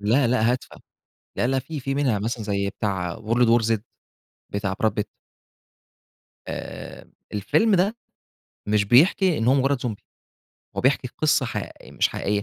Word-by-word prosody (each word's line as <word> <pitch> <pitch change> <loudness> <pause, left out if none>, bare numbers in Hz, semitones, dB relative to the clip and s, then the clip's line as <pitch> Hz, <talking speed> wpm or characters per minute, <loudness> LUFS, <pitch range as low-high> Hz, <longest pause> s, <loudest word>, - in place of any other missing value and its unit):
لا، 120 +6 +3
لا 120 -1 +3
هادفة، 125 - -6 0.6
لا، 120 - +1
لا 135 +1 +1
في 150 +2 -6
في 135 +2 -2
منها 135 -7 +1
مثلًا 110 +2 -3
زي 100 -1 -1
بتاع 95 -4 -2
world 115 +2 +1
war 115 0 +5
z 115 0 +2 0.8
بتاع 100 -2 -1
Brad - - +6
Pitt. - - 0 1.4
آآ - - -7 0.3
الفيلم 200 - +2
ده 200 +6 +2 0.7
مش 105 -1 +2
بيحكي 165 - +5
إن 115 - 0
هو 130 - +6
مجرّد 135 -1 +2
zombie، 110 -5 -4 0.7
هو - - 0
بيحكي 130 -1 +2
قصّة 155 -1 +3
حق - - -4
مش - - 0
حقيقية، 105 0 -1
120 Hz, 155 wpm, -24 LUFS, 105-135 Hz, 1.4 s, Brad